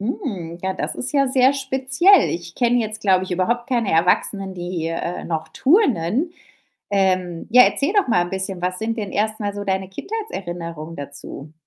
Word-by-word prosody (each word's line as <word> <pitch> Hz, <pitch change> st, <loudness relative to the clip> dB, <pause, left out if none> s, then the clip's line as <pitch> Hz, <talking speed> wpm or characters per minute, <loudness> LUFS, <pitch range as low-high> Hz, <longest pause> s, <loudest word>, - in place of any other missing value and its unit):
Hm, 200 Hz, -, -4 dB
ja, 190 Hz, 0 st, -1 dB
das 190 Hz, -, -3 dB
ist 255 Hz, -, -4 dB
ja 275 Hz, -2 st, +3 dB
sehr 260 Hz, +1 st, +4 dB
speziell. 270 Hz, +7 st, +3 dB
Ich 170 Hz, 0 st, -5 dB
kenne 245 Hz, 0 st, +3 dB
jetzt, 215 Hz, -1 st, -4 dB
glaube 190 Hz, -3 st, +3 dB
ich, 190 Hz, -, -10 dB
überhaupt 235 Hz, +8 st, 0 dB
keine 240 Hz, -7 st, 0 dB
Erwachsenen, 190 Hz, +3 st, +1 dB
die, 175 Hz, -2 st, -4 dB
äh, 165 Hz, +1 st, -4 dB
noch 160 Hz, -1 st, -3 dB
turnen. 270 Hz, -, +2 dB, 0.6 s
Ähm, 185 Hz, -3 st, 0 dB
ja, 250 Hz, +2 st, +8 dB
erzähl 280 Hz, +6 st, +2 dB
doch 410 Hz, -9 st, +2 dB
mal 175 Hz, -7 st, +3 dB
'n 175 Hz, -, -8 dB
bisschen, 190 Hz, -1 st, -3 dB
was 180 Hz, 0 st, -1 dB
sind 225 Hz, +1 st, -2 dB
denn 205 Hz, -3 st, -4 dB
erst 215 Hz, +1 st, 0 dB
mal 205 Hz, -1 st, -2 dB
so 205 Hz, 0 st, -5 dB
deine 190 Hz, -1 st, -1 dB
Kindheitserinnerungen 175 Hz, -, -6 dB
dazu? 145 Hz, +1 st, -8 dB
195 Hz, 180 wpm, -21 LUFS, 175-250 Hz, 0.6 s, ja